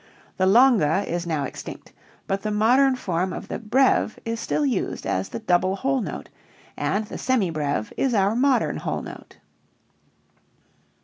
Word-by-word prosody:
The 185 - +2
longa 205 - +4
is 175 0 -3
now 155 -4 -1
extinct, 135 - -8 0.3
but 195 0 -2
the 215 - -2
modern 250 +6 +4
form 185 -5 -2
of - - -7
the - - -4
breve 230 0 +2
is 230 0 -3
still 295 - -1
used 245 -9 -2
as 95 +1 -1
the - - -5
double 185 -3 +1
whole 270 +5 0
note, - - -6 0.5
and 215 +2 -1
the - - -8
semi 235 -9 +1
breve 145 -8 -2
is 260 -3 +1
our 200 +1 +2
modern 265 +1 +2
whole - - -3
note. - - -11
210 Hz, 160 wpm, -24 LUFS, 180-250 Hz, 0.5 s, longa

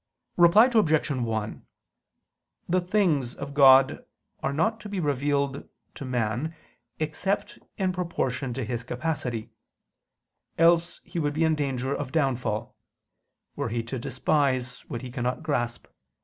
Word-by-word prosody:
Reply 175 +6 +7
Obj. 155 -9 +3
1: 115 -5 -2 1.0
The 180 +1 +2
things 175 - +1
of 140 0 -7
God 135 -1 +6 0.4
are - - -1
not 220 +10 0
to 210 - -9
be 200 -2 -3
revealed 140 -2 -1 0.2
to 140 - -7
man 125 +5 -1 0.4
except 160 +6 -2 0.2
in 185 -2 0
proportion 135 -8 -2
to 130 -3 -2
his 120 +1 -3
capacity: 125 -3 -3 1.1
else 170 +1 +3
he 175 - -5
would 145 -2 0
be 160 - +2
in 160 0 +3
danger 135 -3 -1
of 140 -2 -4
downfall, 125 -8 -1 0.8
were - - -2
he 115 +1 -2
to 120 +2 -5
despise 130 +1 0
what 120 - -5
he 125 - -7
cannot 125 +3 -2
grasp. 120 -6 -2
140 Hz, 135 wpm, -26 LUFS, 125-165 Hz, 1.1 s, Reply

